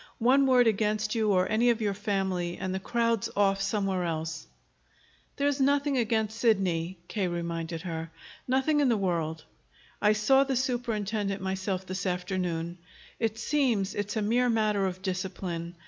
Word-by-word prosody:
One 265 +4 +4
word 250 -2 +5
against 215 0 +1
you 220 -3 +1
or 185 -1 +3
any 230 +3 +3
of 235 -1 +2
your 210 -3 0
family, 190 -4 -2
and 185 0 -3
the 190 - -2
crowd's 230 +1 0
off 195 -1 +3
somewhere 195 -3 0
else." 160 -1 -3 0.9
"There's 285 0 0
nothing 285 +1 +2
against 220 -2 0
Sidney," 185 -6 +1
K. 200 -4 -1
reminded 170 -1 -4
her. 165 -2 -4 0.4
"Nothing 265 +4 +2
in 280 -3 +3
the 230 - +3
world. 165 -5 -1 0.6
I 210 0 +5
saw 265 +6 +4
the 270 -1 -1
superintendent 220 -5 -1
myself 190 0 -2
this 185 +1 -3
afternoon. 180 -2 -2 0.4
It 225 -1 -1
seems 235 -6 +1
it's 205 +1 -3
a 215 - 0
mere 245 +4 +2
matter 210 -3 +2
of 185 0 -6
discipline. 180 -2 -4
205 Hz, 155 wpm, -28 LUFS, 180-230 Hz, 0.9 s, word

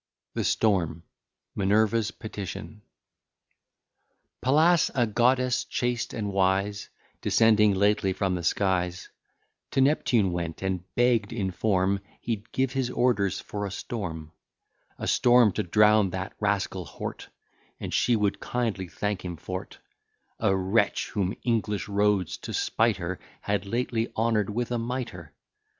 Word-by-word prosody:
THE - - -1
STORM 85 -7 +1 0.5
MINERVA'S 110 +3 +2
PETITION 105 -1 -7 1.6
Pallas, 155 +6 +4
a 120 -3 +3
goddess 125 +3 +2
chaste 120 -1 -2
and 105 -3 -3
wise 100 +2 +1 0.3
Descending 105 -2 +4
lately 100 0 +2
from 95 0 -1
the 90 - -2
skies, 90 0 0 0.6
To - - -1
Neptune 125 -8 +3
went, 85 0 -4
and 95 -2 -1
begg'd 120 -4 +2
in 100 -5 -2
form 95 0 +1 0.2
He'd 115 -1 -4
give 130 0 0
his 130 -2 0
orders 110 -7 +1
for 105 0 -5
a 100 - -2
storm; 85 -7 -5 0.7
A - - -5
storm, 120 -3 +5
to - - -1
drown 105 +2 +4
that 95 +1 -5
rascal 100 -3 -1
Hort, - - -7 0.5
And - - -5
she 120 - +3
would 105 -2 0
kindly 115 -7 -2
thank 105 +3 -3
him 90 -2 -5
for't: 95 +3 -6 0.6
A 95 - +2
wretch! 95 0 +1
whom 100 0 -1
English 110 -4 0
rogues, 100 -3 +1
to - - -7
spite 110 -3 +1
her, 90 0 -4 0.2
Had 100 -1 -1
lately 115 0 -1
honour'd 110 -2 +1
with 120 +3 -2
a 120 - 0
mitre. 125 +2 -5
105 Hz, 135 wpm, -27 LUFS, 95-115 Hz, 1.6 s, storm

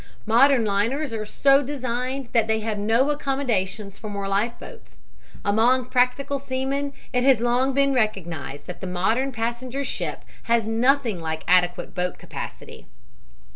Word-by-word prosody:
Modern 240 +2 +5
liners 230 +8 0
are 215 -1 -3
so 275 +6 +4
designed 255 -1 -3
that 230 -2 +3
they 220 0 +1
have 215 -1 -2
no 230 +7 +2
accommodations 220 -9 -2
for 215 - -7
more 200 -1 -4
life 205 +4 +1
boats. - - -13 0.5
Among 235 +5 +3
practical 255 +3 +1
seamen 275 +1 -2 0.2
it 250 0 +2
has 265 -3 +5
long 245 +3 +1
been 275 0 +3
recognized 170 - -2
that 180 - -8
the 190 - -4
modern 220 +9 0
passenger 240 +3 -3
ship - - -4 0.2
has 230 -1 +2
nothing 230 -3 +1
like 160 -1 -3
adequate 180 0 +2
boat 180 0 -2
capacity. - - -9
235 Hz, 145 wpm, -24 LUFS, 205-265 Hz, 0.5 s, Modern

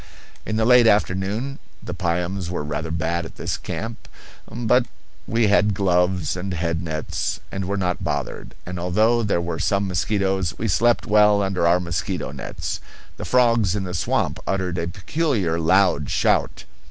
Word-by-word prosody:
In 110 - -1
the 110 0 +2
late 125 -1 +6
afternoon 105 +6 0 0.2
the 90 - -5
piums 90 0 -2
were 85 -4 -3
rather 75 +2 -4
bad 85 +1 -1
at 80 - -10
this - - -3
camp, 115 +1 -6 0.4
but 120 +1 +2 0.4
we 115 +1 +2
had 105 0 +3
gloves 90 -3 +1
and 90 0 -4
head 85 0 -1
nets, 80 0 -3
and 95 -1 -3
were 100 +2 -2
not 90 -2 -1
bothered; - - -4
and 90 0 -5
although 110 +7 +2
there 105 -5 +1
were 85 -1 -3
some 100 0 +1
mosquitoes 95 0 0
we 115 - -2
slept 115 +4 +2
well 105 -1 +4
under 95 -3 +1
our 85 +1 +4
mosquito 85 -4 -3
nets. - - -5 0.4
The - - -6
frogs 115 -6 +3
in 100 - -2
the 90 -1 -5
swamp 85 - 0
uttered 95 -2 -1
a 85 - -2
peculiar, 95 - -1
loud 85 -4 +3
shout. - - +1
95 Hz, 165 wpm, -22 LUFS, 85-105 Hz, 0.4 s, late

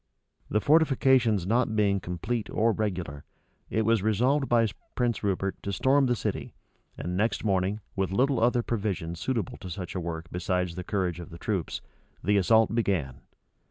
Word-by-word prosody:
The 105 - +2
fortifications 130 - +3
not 115 +2 +1
being 100 -2 +2
complete 95 +7 -3
or 115 +2 +2
regular, 90 -10 -3 0.5
it 110 - +1
was 115 -2 +3
resolved 125 +7 +2
by 115 -1 +4 0.3
Prince 120 -3 0
Rupert 95 -1 -1
to 100 - -3
storm 135 +7 +3
the 120 - +2
city, 105 - -4 0.4
and 90 +1 -3
next 105 +1 0
morning, 100 0 0
with 95 -1 0
little 130 +5 +2
other 120 +1 +3
provisions 95 -8 -2
suitable 115 -3 -2
to 95 -3 -8
such 90 0 -5
a 95 - -2
work 85 -1 -4
besides 90 -1 -1
the 90 +1 -5
courage 90 -3 -1
of 85 - -8
the 85 - -10
troops, 95 -2 -2 0.4
the 105 +1 +3
assault 110 +4 +4
began. 85 - -1
105 Hz, 165 wpm, -28 LUFS, 90-115 Hz, 0.5 s, by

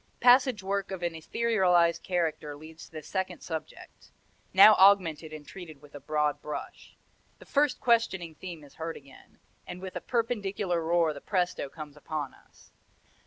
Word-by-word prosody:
Passage 250 -4 +5
work 195 0 -2
of 190 -2 -6
an 170 -1 -1
etherealized 175 -2 +2
character 160 -4 -2
leads 160 +2 -12
to - - -24
the 155 -1 -8
second 190 +3 -4
subject, 160 -2 -8 0.4
now 195 +3 +9
augmented 180 -5 +4
and 155 -1 -9
treated 165 -6 -10
with 145 0 -18
a 145 - -8
broad 150 0 -1
brush. 150 - -8 0.4
The - - -15
first 290 -1 +1
questioning 210 -8 +1
theme 170 -1 -9
is 145 - -16
heard 165 0 -5
again, 140 -1 -17 0.3
and 180 - -7
with 185 0 -8
a - - -4
perpendicular 205 -7 -1
roar 165 -1 +2
the 140 - -10
presto 180 -7 -1
comes 150 0 -10
upon 150 -2 -5
us. - - -23
175 Hz, 165 wpm, -28 LUFS, 155-195 Hz, 0.4 s, now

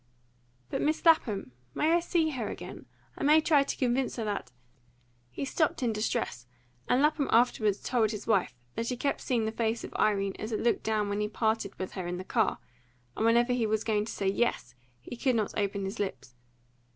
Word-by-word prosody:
"But - - -1
Miss 310 +3 0
Lapham! 225 - +3 0.2
I 305 - +1
may 340 +2 +4
see 330 -2 +1
her 245 -6 -3
again? - - -8 0.3
I - - -5
may 300 +2 +6
try 305 -2 +4
to 275 - -2
convince 255 0 0
her 230 - -3
that 205 - -3 0.4
" 120 - -37 0.3
He 125 - -4
stopped 300 -1 0
in 235 -2 +1
distress, 210 - -2 0.4
and 255 +3 +4
Lapham 300 -2 +2
afterwards 220 -3 +3
told 235 -4 +2
his 210 -1 -5
wife 195 - +1 0.2
that 230 - -3
he 250 - -2
kept 280 +3 -1
seeing 235 -4 0
the 220 - -1
face 225 0 -1
of - - -8
Irene 200 -2 +1
as 215 - -5
it 215 - -1
looked 235 - +1
when 210 -2 0
he 210 - 0
parted 220 -1 -1
with 185 - -4
her 185 -2 -5
in 180 0 -3
the 185 - -5
car; 220 +1 +1 0.6
and - - -1
whenever 240 +2 +4
he 240 -3 +1
was 215 0 0
going 210 -2 +1
to - - -6
say 195 - -2
yes, 195 - 0 0.3
he 185 - -8
could 255 +1 +1
not 215 -3 -1
open 200 -1 -1
his 195 +4 -5
lips. 190 -10 -4
225 Hz, 210 wpm, -29 LUFS, 205-250 Hz, 0.6 s, may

